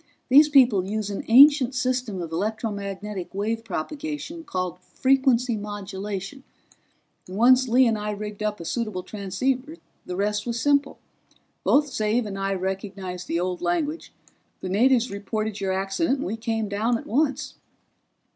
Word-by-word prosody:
"These 295 +4 +7
people 250 -9 +5
use 210 -1 -2
an 200 - -4
ancient 270 +1 +7
system 250 -7 -1
of 165 - -7
electromagnetic 200 -1 -4
wave 225 +3 -2
propagation 295 - -5
called 185 - -3
frequency 260 +2 +2
modulation, 205 +2 -6 0.8
and 185 +2 -7
once 255 +3 +5
Lee 250 +2 +5
and 225 -2 +1
I 210 0 -3
rigged 210 0 -5
up 210 0 -2
a 170 - -7
suitable 215 -3 -3
transceiver 255 - -2 0.3
the 180 - -4
rest 210 +3 -1
was 235 0 -2
simple. 285 +1 +2 0.7
Both 290 -1 +3
Xav 220 0 0
and 195 -1 -5
I 195 0 -1
recognized 190 -1 -5
the 170 - -1
old 180 0 -2
language; 290 - -2 0.5
the 185 - -4
natives 245 +4 +3
reported 210 +1 -3
your 190 -1 0
accident, 195 - 0
and - - -4
we 205 - -2
came 225 -1 -2
down 220 +4 0
at - - -10
once." 280 +2 0
215 Hz, 150 wpm, -24 LUFS, 195-255 Hz, 0.8 s, These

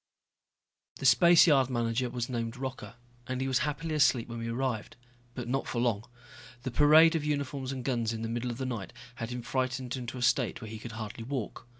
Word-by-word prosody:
The - - -6
spaceyard 145 0 +6
manager 120 0 0
was 120 -1 -3
named 115 -1 -3
Rocca, 125 -4 -6 0.3
and 130 0 -3
he 135 - -1
was 130 -1 +2
happily 150 +2 -2
asleep 135 -5 +3
when 115 0 -5
we 115 - -4
arrived. 120 -2 -2 0.4
But 125 -2 -5
not 135 +2 -1
for 120 - -2
long. 115 -3 0 0.6
The 130 - -3
parade 155 +5 +6
of 160 - 0
uniforms 140 -3 -2
and 130 -2 -5
guns 120 -4 0
in 115 0 -4
the - - -2
middle 120 +2 -2
of 120 - -4
the 130 - -3
night 115 -8 -5 0.2
had 115 -1 -4
him 125 -1 -5
frightened 130 0 -2
into 125 -1 -6
a 125 - -3
state 125 +1 +2
where 110 -3 -8
he 110 - -7
could 115 +1 -8
hardly 110 0 -6
walk. 125 -2 -5
125 Hz, 210 wpm, -30 LUFS, 115-135 Hz, 0.6 s, spaceyard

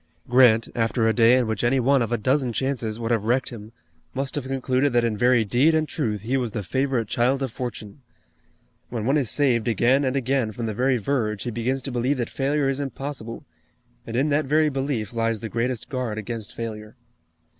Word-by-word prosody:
Grant, 120 -3 +5
after 115 0 +1
a 110 - +3
day 120 +2 +5
in 125 - +2
which 110 -1 -2
any 125 +3 +3
one 135 +2 +3
of 115 - -1
a 120 - +1
dozen 130 +1 +1
chances 120 -4 -2
would 115 0 -2
have 110 -3 +1
wrecked 125 +3 +1
him, 110 -2 -10 0.4
must 135 0 -2
have 140 -3 -3
concluded 130 0 0
that 120 -1 +3
in 115 -2 0
very 120 +1 +3
deed 130 +10 +3
and 155 -1 +1
truth 110 - -2
he 125 +6 0
was 120 -5 -2
the 105 - -3
favorite 130 +1 -1
child 130 +5 +1
of 130 - -3
Fortune. 120 0 -7 0.9
When 115 -3 -3
one 135 +4 +2
is 135 -7 +1
saved 125 -5 +1
again 120 +5 +3
and 130 0 0
again 130 -4 0
from 115 +2 -4
the 110 - -2
very 130 +4 +2
verge 110 -3 -1
he 120 - -3
begins 125 +4 -2
to 135 - -3
believe 125 +3 0
that 120 -2 -3
failure 140 +1 0
is 135 0 -1
impossible, 135 -4 -6 0.6
and 115 - -5
in 135 +5 +2
that 150 +1 +1
very 155 +2 +3
belief 135 -6 -2
lies 115 -1 0
the 115 - -6
greatest 120 +1 -2
guard 125 -5 -3
against 110 0 -6
failure. 110 -1 -6
125 Hz, 210 wpm, -24 LUFS, 115-135 Hz, 0.9 s, Grant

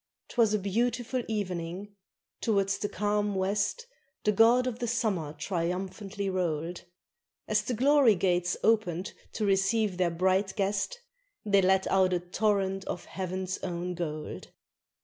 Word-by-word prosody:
_ - - -55
'Twas 230 -4 +3
a 215 - +3
beautiful 240 +5 -1
evening: 185 -2 -4 0.5
towards 200 -3 +1
the 205 - -2
calm 205 -1 0
west 205 - 0 0.4
The 210 - +3
god 230 +4 +5
of 245 -2 -3
the 240 - -2
summer 210 -10 -1
triumphantly 190 +5 -3
rolled; 175 -2 -2 0.6
As - - +2
the 245 - -3
glory 270 -2 +5
gates 175 -1 +1
oped 200 -5 +1 0.2
to 215 - -1
receive 195 0 +2
their 180 -1 +2
bright 190 +3 +1
guest 205 - -1 0.4
They 200 -2 +4
let 190 0 +3
out 190 -1 +3
a 180 - +2
torrent 195 +1 0
of - - -5
heaven's 185 0 -4
own 180 0 -3
gold. 155 -3 -5
195 Hz, 140 wpm, -29 LUFS, 180-215 Hz, 0.6 s, god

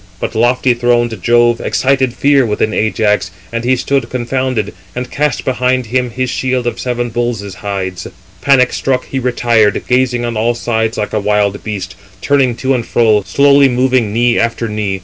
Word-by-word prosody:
But - - -3
lofty 120 +2 +2
throned 120 -1 0
Jove 120 0 +3
excited 130 -2 0
fear 140 -1 +3
within 110 -1 -1
Ajax, 105 -2 0 0.2
and 115 0 -2
he 130 +2 +2
stood 130 -1 -1
confounded, 125 -3 -2 0.2
and 125 +1 -5
cast 150 -2 -1
behind 130 0 0
him 125 +2 -1
his 130 +2 -2
shield 130 0 -1
of 120 - -3
seven 120 -1 -2
bulls' 115 -4 -3
hides. 95 -2 -5 0.3
Panic 130 -3 +3
struck 130 -1 -1
he 135 - -3
retired, 120 -4 +1
gazing 125 -1 +1
on 120 -1 -3
all 115 +2 0
sides 110 -1 -1
like 105 - -3
a 110 - +1
wild 100 -1 0
beast, 95 -4 -5 0.3
turning 135 -2 +1
to 130 +2 0
and 120 -3 -2
fro, 110 -3 +3
slowly 140 -1 +4
moving 125 -3 +1
knee 120 +2 +2
after 115 0 -1
knee. 105 -3 -3
120 Hz, 170 wpm, -14 LUFS, 110-130 Hz, 0.3 s, slowly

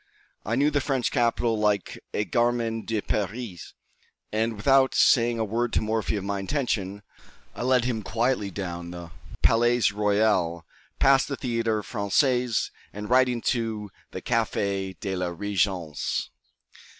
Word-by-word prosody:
I 110 - -1
knew 145 +4 +3
the 145 -1 +1
French 130 -3 0
capital 120 -2 +1
like 105 -3 0
a 105 - -1
gamin 120 -2 0
de 110 -2 -1
Paris; 105 -2 -4 0.6
and, 110 +1 0
without 130 +5 +3
saying 120 -1 +4
a 110 - 0
word 115 +3 -1
to - - +2
Morphy 110 0 -1
of 100 - -3
my 100 0 -2
intention, 100 -4 -2 0.5
I - - -7
led 125 -1 +3
him 120 -3 -1
quietly 115 -1 0
down 85 -2 -5
the 85 -1 -8 0.3
Palais 120 -2 +4
Royal, 100 -5 +1 0.3
past 135 0 +4
the 140 - -4
Théâtre 115 -3 -1
Français, 125 +3 +1 0.2
and 105 +2 -7
right 130 0 +5
into 115 -4 -2 0.2
the - - -7
Café 95 -2 -1
de 95 -3 -3
la 90 -1 -1
Régence. 95 -5 -1
110 Hz, 140 wpm, -26 LUFS, 100-120 Hz, 0.6 s, right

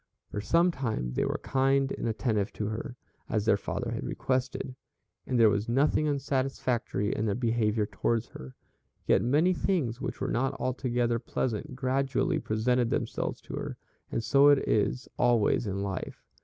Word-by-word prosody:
For 105 - -3
some 170 - +3
time 115 - -2
they - - 0
were - - -1
kind 135 0 +2
and - - -3
attentive 110 -3 0
to 105 - -3
her, 125 +4 -5 0.3
as 105 -2 0
their 105 - +5
father 100 - -3
had - - -3
requested, 130 0 -2 0.5
and 125 -2 +1
there 115 - +7
was 105 +3 -1
nothing 145 +4 +2
unsatisfactory 130 -6 -1
in 110 - -1
their 100 - 0
behavior 115 -3 +1
towards 115 +2 -1
her, 65 0 -10 0.5
yet - - +4
many 150 +9 +3
things 140 - -1
which 135 - -4
were - - -2
not 130 +3 0
altogether 120 -2 0
pleasant 120 0 -3
gradually 135 +1 0
presented 120 +2 +1
themselves - - -2
to - - -10
her, - - -4 0.3
and 115 - -1
so 140 +4 +5
it 145 -1 +5
is 115 +4 +1
always 120 -2 +3
in 100 0 -2
life. 95 -2 -5
120 Hz, 165 wpm, -29 LUFS, 110-135 Hz, 0.5 s, there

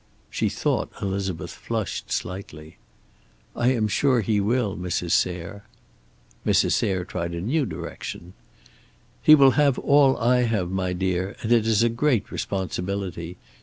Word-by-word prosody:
She - - 0
thought - - -1
Elizabeth 95 -3 -3
flushed - - -4
slightly. 80 -4 -5 0.8
"I 120 +2 +2
am 110 -4 0
sure 130 +3 +2
he 105 0 +1
will, 105 0 0
Mrs. 90 -1 -3
Sayre." 90 +3 -1 0.8
Mrs. - - +2
Sayre 95 -2 0
tried 85 -2 -4
a 85 - -4
new 135 - 0
direction. 90 -3 -7 0.9
"He 155 - +8
will 135 -2 +6
have 140 -2 +2
all 140 -2 +4
I 125 +2 +3
have, 105 -7 0
my 95 -1 -1
dear, 95 +1 -2
and 115 - -2
it 115 -2 +4
is 110 0 +3
a 120 - +3
great 115 -2 0
responsibility. 95 -2 -4
100 Hz, 140 wpm, -24 LUFS, 90-120 Hz, 0.9 s, He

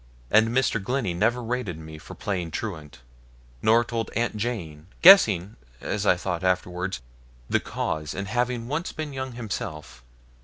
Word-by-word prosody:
And 110 +1 +6
Mr. 120 -4 +1
Glennie 125 -4 -1
never 120 +8 +1
rated 115 -8 -3
me 80 -1 -10
for 70 - -11
playing 90 -5 -3
truant, 80 - -6 0.6
nor 115 +2 +5
told 115 -1 -3
Aunt 115 -1 0
Jane, 90 -9 -4 0.2
guessing, 105 - +7 0.2
as 105 0 -2
I - - +6
thought 90 -1 -3
afterwards, 90 -3 -1 0.4
the - - +2
cause, 75 -1 -3
and 100 +1 -4
having 120 +2 -1
once 150 +6 -2
been 155 -3 -5
young 130 -1 -4
himself. 90 - -6
105 Hz, 150 wpm, -25 LUFS, 85-120 Hz, 0.6 s, guessing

